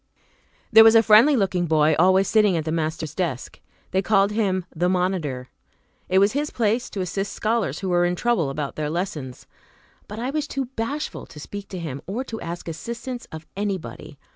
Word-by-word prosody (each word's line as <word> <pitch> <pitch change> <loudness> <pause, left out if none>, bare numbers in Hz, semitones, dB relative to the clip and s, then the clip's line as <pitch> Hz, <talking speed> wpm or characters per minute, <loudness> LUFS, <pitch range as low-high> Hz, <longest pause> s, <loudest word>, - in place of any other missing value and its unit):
There 220 0 +9
was 225 0 +7
a 225 - +7
friendly 225 +7 +6
looking 185 -6 0
boy 155 -1 +3
always 190 +2 +4
sitting 210 -5 +3
at 160 - -3
the 155 - -2
master's 160 -1 -2
desk; 165 -9 -4 0.3
they 190 - +2
called 200 0 +3
him 195 -4 0
"the 175 +3 +1
monitor." 180 -9 -1 0.6
It 185 - +3
was 200 +2 +5
his 295 +2 -1
place 230 +1 0
to 195 - -4
assist 195 +3 -3
scholars 225 -1 -1
who 190 - -2
were 175 0 +3
in 175 0 0
trouble 215 -8 +1
about 140 0 -4
their 150 -1 -2
lessons, 155 -7 -4 0.6
but 210 - -8
I 245 +4 -2
was 300 0 -2
too 275 -3 -3
bashful 280 +7 -4
to 150 - -12
speak 200 +6 -8
to 190 - -7
him, 145 -5 -5
or 220 +7 -3
to 225 -4 -7
ask 170 +1 -6
assistance 235 +9 -6
of 160 0 -8
anybody. 190 -7 -5
190 Hz, 190 wpm, -23 LUFS, 160-225 Hz, 0.6 s, There